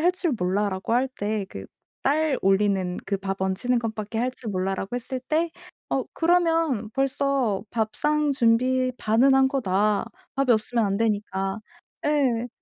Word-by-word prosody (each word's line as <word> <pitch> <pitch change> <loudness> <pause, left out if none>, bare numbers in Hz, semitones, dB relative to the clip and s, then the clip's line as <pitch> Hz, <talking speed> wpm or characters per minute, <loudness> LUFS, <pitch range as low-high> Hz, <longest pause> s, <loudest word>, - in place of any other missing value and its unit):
할 355 +3 +4
줄 365 -4 -1
몰라.'라고 190 +2 -1
할 250 +3 +2
때 205 -2 -2
그 95 0 -8 0.4
'쌀 295 +1 +2
올리는 195 -2 +2
그 200 - 0
밥 195 0 -4
안치는 195 +6 +1
것밖에 220 -1 -4
할 250 +2 +1
줄 245 -3 -7
몰라.'라고 195 +2 -2
했을 250 +1 -4
때 315 +6 0 0.4
'어 - - 0
그러면 330 -9 +2
벌써 270 -5 0
밥상 290 +7 0
준비 255 +1 +2
반은 240 +5 +4
한 265 0 +5
거다. 210 -5 +1 0.3
밥이 270 -1 +1
없으면 225 +1 +1
안 195 0 0
되니까.' 205 -2 -1 0.5
예. 260 -6 +2
230 Hz, 260 characters per minute, -25 LUFS, 200-270 Hz, 0.5 s, 한